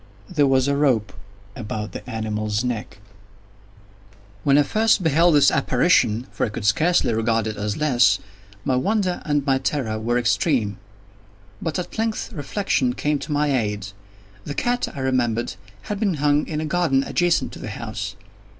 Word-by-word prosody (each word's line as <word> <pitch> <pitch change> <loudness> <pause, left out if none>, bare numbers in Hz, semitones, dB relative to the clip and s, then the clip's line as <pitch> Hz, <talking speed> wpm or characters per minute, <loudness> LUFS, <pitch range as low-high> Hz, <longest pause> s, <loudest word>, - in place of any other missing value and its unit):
There 150 -6 +2
was 130 0 +3
a 140 - +1
rope 120 -9 +1 0.4
about 105 -2 -5
the - - -8
animal's 110 -1 -2
neck. 120 -6 -4 1.5
When 140 0 +4
I 145 - +6
first 220 +4 +2
beheld 165 +1 +4
this 145 -2 +6
apparition—for 130 -4 +1
I 125 - +1
could 105 0 -6
scarcely 155 - +3
regard 115 0 +1
it 110 -1 -3
as 105 0 -3
less—my 110 -5 0
wonder 185 +5 0
and 145 -2 0
my 135 -2 +2
terror 115 -7 -2
were 120 +2 0
extreme. 120 - +1 0.8
But 160 - -2
at 180 +4 -5
length 225 -1 -2
reflection 145 -4 0
came 150 +2 -1
to - - -7
my 145 -1 +1
aid. 105 -4 -2 0.5
The 145 - -6
cat, 245 0 0
I 135 - -7
remembered, 120 -3 0 0.3
had 205 - -4
been 200 -5 +1
hung 145 0 +2
in 155 -2 -3
a - - -2
garden 155 -4 +1
adjacent 175 +2 +1
to - - -10
the 120 - -6
house. 110 -1 -5
130 Hz, 160 wpm, -22 LUFS, 110-150 Hz, 1.5 s, I